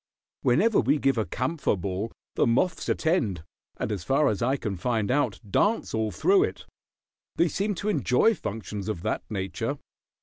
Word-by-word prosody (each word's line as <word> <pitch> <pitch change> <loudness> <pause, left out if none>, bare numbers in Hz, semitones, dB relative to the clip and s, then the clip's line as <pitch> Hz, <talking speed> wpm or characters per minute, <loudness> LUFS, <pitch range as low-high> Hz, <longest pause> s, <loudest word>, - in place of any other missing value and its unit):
Whenever 200 - +3
we 140 +6 +3
give 135 -4 +1
a 110 - -1
camphor 130 0 -1
ball 95 +4 -3 0.2
the - - +2
moths 165 +9 +1
attend, 115 - 0 0.3
and - - -2
as 100 -5 -3
far 140 +8 +3
as 105 - -2
I 130 +4 +2
can 105 -6 -3
find 110 +3 0
out 145 +2 +1
dance 205 - +1
all 110 -1 0
through 385 - +3
it. - - -7 0.7
They 170 - +3
seem 200 +5 -1
to 205 +4 -2
enjoy 150 - +3
functions 105 - -5
of 95 -5 -4
that 110 - -1
nature. 95 -4 -3
120 Hz, 170 wpm, -26 LUFS, 105-165 Hz, 0.7 s, Whenever